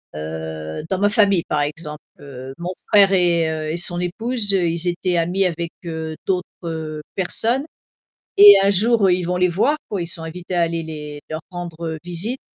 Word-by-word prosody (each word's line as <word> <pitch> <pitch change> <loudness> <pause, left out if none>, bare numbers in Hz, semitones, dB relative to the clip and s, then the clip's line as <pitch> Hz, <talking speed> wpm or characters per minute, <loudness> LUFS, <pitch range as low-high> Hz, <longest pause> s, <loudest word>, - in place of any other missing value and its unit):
heu, 80 - -6
dans 190 -1 -1
ma 205 - +3
famille 200 -4 +3
par 150 - 0
exemple, 150 0 -5 0.2
heu, 135 -2 -9
mon 175 +1 -4 0.2
frère 200 -2 +5
et 170 -3 +2
heu, 155 -1 -3
et 165 - -2
son 175 0 0
épouse, 215 +5 +2
ils 170 -2 0
étaient 175 0 0
amis 180 +4 +1
avec, 170 -1 -2
heu, 160 -1 -5
d'autres, 180 -2 0 0.2
heu, 160 -2 -5
personnes 230 +8 +1 0.7
et 205 0 +10
un 195 - +4
jour 205 0 +3
ils 180 0 +1
vont 180 +1 -1
les 180 0 +3
voir, 210 - +1
quoi, 195 -4 -2
ils - - -4
sont 165 -1 -5
invités 175 +3 -6
à 175 - +2
aller 165 0 -1
les 150 -2 -7
leur 155 0 -4
rendre, 175 -2 -7
heu, 160 -1 -4
visite 180 +9 -4
175 Hz, 190 wpm, -20 LUFS, 160-190 Hz, 0.7 s, et